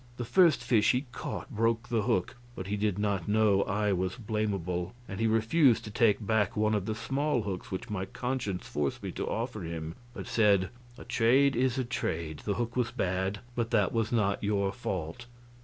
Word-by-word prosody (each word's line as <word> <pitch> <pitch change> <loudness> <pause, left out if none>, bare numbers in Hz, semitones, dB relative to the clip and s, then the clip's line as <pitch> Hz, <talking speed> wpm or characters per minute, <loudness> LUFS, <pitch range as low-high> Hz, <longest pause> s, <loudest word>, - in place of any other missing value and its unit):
The 120 - -3
first 155 +2 +4
fish 115 -2 +4
he 125 +3 0
caught - - -6
broke 115 +1 0
the 115 -3 +1
hook, 105 -5 0 0.2
but 95 - -5
he 100 +2 -2
did 105 -2 0
not 100 -4 -1
know 105 -2 +4
I 105 0 0
was 95 0 -1
blamable, 100 -6 -2
and 95 - -6
he 115 - +2
refused 115 +4 +3
to 105 - -7
take 105 -1 +2
back 110 +2 +1
one 110 0 +2
of 105 -2 -1
the 110 - -1
small 135 +1 0
hooks 95 -3 -5
which 95 - -4
my 95 -2 -2
conscience 125 -5 -3
forced 75 -2 -2
me - - -3
to - - -4
offer 115 -2 -3
him, 80 -1 -5 0.2
but 95 -5 -6
said, 100 -4 +3 0.3
"A - - -9
trade 130 +4 +3
is 125 +1 +1
a 130 - 0
trade; 80 -9 -3
the 100 - 0
hook 120 +2 -2
was 125 -3 +1
bad, 95 -3 -1
but 120 -1 -1
that 105 -5 +2
was 115 -2 0
not 105 -4 +1
your 100 -1 +1
fault." 95 -2 -4
105 Hz, 200 wpm, -30 LUFS, 95-120 Hz, 0.3 s, first